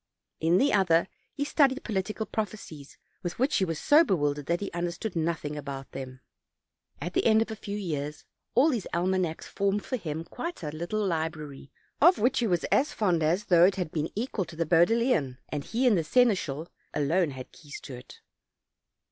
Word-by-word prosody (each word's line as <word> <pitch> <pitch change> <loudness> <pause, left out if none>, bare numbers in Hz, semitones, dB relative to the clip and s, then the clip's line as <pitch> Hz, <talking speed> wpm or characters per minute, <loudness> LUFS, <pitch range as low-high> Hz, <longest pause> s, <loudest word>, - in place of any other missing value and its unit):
In 165 +3 +3
the 280 +6 +3
other 185 -4 +3 0.2
he 285 - -3
studied 280 -2 +2
political 215 +1 -2
proph 215 -1 -2
ecies, 155 -9 -11 0.2
with 175 -1 -4
which 265 +5 +2
he 190 - +2
was 165 -3 -3
so 300 - +5
bewildered 145 - 0
that 170 +1 +1
he 200 - -4
under 175 0 -2
stood 180 +3 -5
nothing 160 -2 -2
about 140 -2 -6
them. 130 -1 -8 0.8
At 175 +5 -5
the - - +2
end 220 0 +5
of 225 - -10
a - - -4
few 205 -1 -5
years 150 -6 -4 0.3
all 270 +7 +5
these 240 - -2
almanacs 180 -2 0
formed 200 +1 -1
for 255 - -2
him 160 -5 -4
quite 335 - -6
a 150 - -3
little 175 +7 -2
library, 155 -5 -4 0.3
of 350 +4 +7
which 245 +5 +2
he 235 - +1
was 175 -4 +1
as 285 - +3
fond 180 -6 +1
as 170 +7 +1
though 175 -3 +5
it 195 - +3
had 180 -5 -3
been 155 0 -2
equal 215 -3 -2
to 170 - -11
the 165 +1 -1
Bodleian, 170 - +3
and 145 -2 -4
he 245 +3 0
and 240 -4 +5
the 170 - +1
seneschal 180 - +1 0.3
alone 160 +4 +2
had 130 -2 -9
keys 145 -3 -10
to 135 - -9
it. 125 0 -12
175 Hz, 200 wpm, -28 LUFS, 155-215 Hz, 0.8 s, of